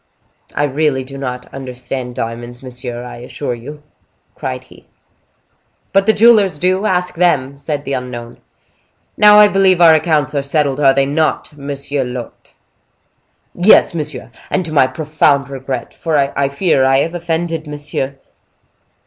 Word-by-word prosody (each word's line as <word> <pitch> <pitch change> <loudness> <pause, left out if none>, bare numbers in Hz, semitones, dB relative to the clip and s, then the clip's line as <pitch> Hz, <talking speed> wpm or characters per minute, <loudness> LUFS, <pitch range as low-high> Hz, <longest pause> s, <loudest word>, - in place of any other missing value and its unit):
"I - - +1
really 145 -1 0
do 135 +1 -10
not 125 -2 -5
understand 125 -1 -6
diamonds, 120 +2 -6
monsieur, 125 -1 -7
I 125 - -9
assure 125 +2 -5
you," 145 +6 -10 0.5
cried - - -5
he. - - -19 1.1
"But 195 +1 +3
the - - +7
jewelers 210 -6 +4
do: 185 +5 +1
ask 180 -1 0
them," 145 -6 +1
said 145 +1 -4
the 140 - -3
unknown. 120 -2 -6 0.7
"Now 210 0 +7
I 210 0 +8
believe 195 -3 +3
our 165 -2 +7
accounts 155 -2 +1
are 140 - 0
settled, 140 -1 0
are 135 -2 +4
they 135 0 +3
not, 155 +1 -1
monsieur 140 -1 -3
l'hote?" 125 -1 -8 1.0
"Yes, 180 +1 +5
monsieur, 150 -5 -5 0.2
and 185 - -1
to 160 - -6
my 130 -4 +4
profound 140 0 +1
regret; 135 -2 -5
for 160 -2 -1
I 140 0 0
fear 140 -1 +2
I 135 0 +4
have 165 - -2
offended 165 -2 -3
monsieur." 145 -2 -4
145 Hz, 150 wpm, -16 LUFS, 130-165 Hz, 1.1 s, I